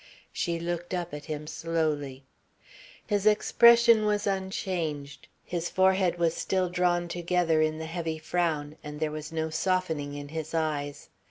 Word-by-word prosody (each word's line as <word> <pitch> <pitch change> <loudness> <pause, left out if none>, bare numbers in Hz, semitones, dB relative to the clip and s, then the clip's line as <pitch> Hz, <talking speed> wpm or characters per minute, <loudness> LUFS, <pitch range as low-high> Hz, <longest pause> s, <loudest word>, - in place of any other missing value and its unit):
She 170 -2 -1
looked 175 +1 -3
up 175 -3 -4
at 150 0 -7
him 150 -1 -5
slowly. 150 -4 -2 0.8
His 205 0 +1
expression 235 +1 +6
was 210 0 +1
unchanged, 185 -7 -3 0.2
his 175 -1 -3
forehead 190 -1 +3
was 170 -1 +2
still 185 +1 0
drawn 175 -1 +1
together 170 -2 +1
in 155 0 +1
the 160 - -5
heavy 165 -1 -3
frown 155 -2 -1
and 150 0 -7
there 155 -1 -1
was 155 0 -6
no 160 0 -2
softening 160 -4 -1
in 145 0 -7
his 160 +1 -5
eyes. 145 -3 -2
165 Hz, 150 wpm, -28 LUFS, 155-180 Hz, 0.8 s, expression